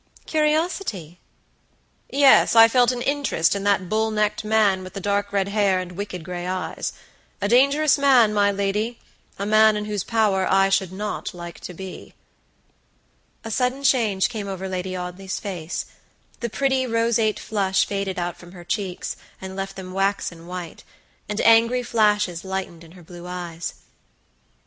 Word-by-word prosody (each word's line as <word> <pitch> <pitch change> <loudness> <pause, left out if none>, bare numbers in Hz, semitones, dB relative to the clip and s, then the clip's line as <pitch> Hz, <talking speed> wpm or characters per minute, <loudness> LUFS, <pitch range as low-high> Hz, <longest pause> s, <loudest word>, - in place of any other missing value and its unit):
"Curiosity?" 305 - -1 0.9
"Yes; 275 -4 +5
I 225 0 +9
felt 245 +1 +3
an 245 -1 -4
interest 280 - +1
in 200 - -3
that 200 -2 +2
bull 220 +3 +1
necked 215 -1 0
man, 210 -3 +2
with 185 0 -10
the - - -3
dark 200 +1 -1
red 200 -1 0
hair 200 -2 +2
and 180 -1 -6
wicked 180 -2 -6
gray 175 +1 -5
eyes. 185 0 -3 0.5
A 200 - 0
dangerous 280 +6 +4
man, 255 -6 +5
my 205 -1 +3
ladya 200 +4 -1 0.4
man 215 +1 +4
in 210 - -3
whose 210 -3 -2
power 210 -5 +1
I 195 0 +4
should 190 -2 +1
not 210 0 -5
like 175 -1 -8
to 180 - -9
be." 190 +1 -9 1.3
A 225 - -6
sudden 255 +4 0
change 225 -8 +3
came 215 -4 -5
over 190 -1 -5
Lady 185 0 -4
Audley's 180 +2 -5
face; 175 -5 -5 0.5
the 235 - -3
pretty, 265 +1 0
roseate 230 -2 +1
flush 195 -3 +1
faded 195 -2 -3
out 175 -1 -3
from 175 0 -14
her 175 -2 -11
cheeks, 185 0 -3 0.2
and 190 0 -7
left 195 0 -5
them 185 -1 -8
waxen 195 -3 -2
white, 180 -2 -7 0.5
and 210 +1 -2
angry 230 +2 +4
flashes 210 -7 +1
lightened 190 -3 -5
in 165 0 -15
her 180 -2 -15
blue 175 +1 -11
eyes. 175 -2 -5
200 Hz, 160 wpm, -23 LUFS, 185-225 Hz, 1.3 s, I